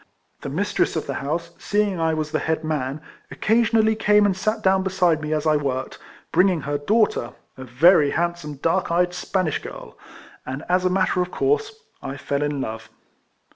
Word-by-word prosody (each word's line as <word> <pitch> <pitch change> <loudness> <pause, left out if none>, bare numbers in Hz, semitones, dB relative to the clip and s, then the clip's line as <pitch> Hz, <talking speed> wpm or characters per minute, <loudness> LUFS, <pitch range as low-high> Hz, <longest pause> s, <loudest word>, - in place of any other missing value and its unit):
The - - -5
mistress - - 0
of - - -2
the - - -4
house, 165 +4 -3
seeing 205 -3 0
I 160 -1 +1
was 155 -1 -3
the - - 0
head 160 0 -1
man, 145 -2 -2 0.3
occa 225 +2 +2
sionally 220 -1 +2
came 210 -1 +4
and 195 -2 +2
sat 215 +3 -2
down 190 0 +3
beside 180 -4 +1
me 155 0 -4
as 155 0 -1
I 155 -1 +3
Avorked, 130 -2 -3 0.3
bringing 180 -1 +3
her 145 +1 -2
daughter, 205 - +1 0.2
a 130 - -9
very 145 +5 +5
handsome 170 -2 -2
dark 165 +6 0
eyed 175 +1 +1
Spanish 180 -3 -1
girl, - - -10 0.5
and 135 +4 -6
as 180 +1 +1
a - - +4
matter 185 0 +1
of 180 - -2
course 435 - -1 0.2
I 135 +1 -6
fell 140 +1 -2
in 145 -1 -1
love. 110 -3 -6
170 Hz, 185 wpm, -22 LUFS, 145-190 Hz, 0.5 s, very